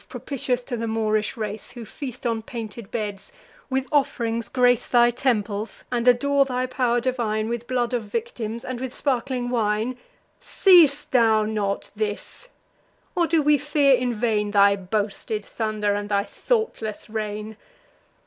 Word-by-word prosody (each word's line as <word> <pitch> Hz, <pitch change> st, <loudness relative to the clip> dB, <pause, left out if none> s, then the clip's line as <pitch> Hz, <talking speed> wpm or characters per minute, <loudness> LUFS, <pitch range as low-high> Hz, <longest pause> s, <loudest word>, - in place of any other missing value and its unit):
propitious 250 Hz, 0 st, -2 dB
to 245 Hz, -, -4 dB
the 230 Hz, 0 st, -3 dB
Moorish 215 Hz, +1 st, 0 dB
race, 215 Hz, +1 st, -5 dB
Who 240 Hz, -2 st, -8 dB
feast 255 Hz, 0 st, -8 dB
on 230 Hz, -2 st, 0 dB
painted 225 Hz, -2 st, -7 dB
beds, 210 Hz, -, -4 dB, 0.4 s
with 265 Hz, 0 st, 0 dB
off'rings 235 Hz, -6 st, 0 dB
grace 245 Hz, -2 st, +3 dB
Thy 240 Hz, -1 st, +5 dB
temples, 220 Hz, -4 st, -1 dB
and 240 Hz, 0 st, -1 dB
adore 275 Hz, +3 st, +4 dB
thy 255 Hz, -1 st, -1 dB
pow'r 250 Hz, -2 st, +1 dB
divine 230 Hz, -4 st, -1 dB
With 235 Hz, 0 st, -4 dB
blood 250 Hz, -1 st, 0 dB
of 235 Hz, -3 st, -1 dB
victims, 230 Hz, +1 st, -4 dB
and 255 Hz, -1 st, -4 dB
with 260 Hz, -1 st, -5 dB
sparkling 250 Hz, -2 st, -1 dB
wine, 225 Hz, +1 st, 0 dB, 0.4 s
Seest 330 Hz, -7 st, +5 dB
thou 225 Hz, -4 st, +4 dB
not 210 Hz, -2 st, -2 dB
this? 215 Hz, -, -4 dB, 0.6 s
or 345 Hz, -2 st, +2 dB
do 325 Hz, -2 st, +2 dB
we 295 Hz, 0 st, +4 dB
fear 290 Hz, -1 st, +3 dB
in 245 Hz, -1 st, -1 dB
vain 210 Hz, -2 st, 0 dB
Thy 200 Hz, -1 st, +5 dB
boasted 205 Hz, +2 st, -3 dB
thunder, 215 Hz, -2 st, -1 dB
and 205 Hz, 0 st, -3 dB
thy 200 Hz, -1 st, +2 dB
thoughtless 440 Hz, -, -2 dB
reign? 215 Hz, 0 st, -4 dB
235 Hz, 150 wpm, -24 LUFS, 215-255 Hz, 0.6 s, Thy